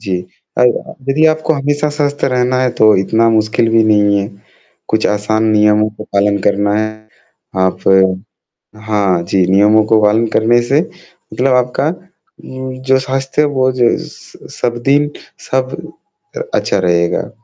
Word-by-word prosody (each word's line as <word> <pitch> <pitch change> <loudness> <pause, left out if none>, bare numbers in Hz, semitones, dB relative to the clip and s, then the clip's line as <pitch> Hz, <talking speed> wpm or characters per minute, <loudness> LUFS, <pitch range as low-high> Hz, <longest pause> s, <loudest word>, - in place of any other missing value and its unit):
जी, 95 -4 -3 0.4
और 125 - +5 0.2
हाँ, - - -11
यदि 150 +4 +2
आपको 155 0 +1
हमेशा 145 +1 -1
स्वस्थ 145 -1 -1
रहना 125 0 0
है 130 -1 +1
तो 110 -1 +6
इतना 110 +4 +1
मुश्किल 110 +1 +1
भी 115 0 +4
नहीं 105 -1 +3
है। 100 - -4 0.6
कुछ 110 0 0
आसान 105 +2 -1
नियमों 105 0 +2
का 105 0 -11
पालन 100 0 +2
करना 100 +1 +1
है 110 +1 -1 0.7
आप 95 - -2 1.1
हाँ 100 -5 +1
जी 95 -2 +2
नियमों 105 +3 +4
को 110 0 +3
पालन 110 +2 +3
करने 120 +2 +3
से 135 +5 +1 0.5
मतलब 130 0 +1
आपका 125 +3 0
उम, 130 -7 -9
जो 130 0 +2
साथ 130 +1 -2 0.2
से 150 - +4
वो 130 -3 0
ज 120 -2 +2
स - - -16 0.2
सब 120 -1 -1
दिन 145 +1 +2 0.4
सब 130 0 -1 0.6
अ, - - -3
अच्छा 100 - 0
रहेगा। 85 +1 0
115 Hz, 155 wpm, -14 LUFS, 105-130 Hz, 1.1 s, तो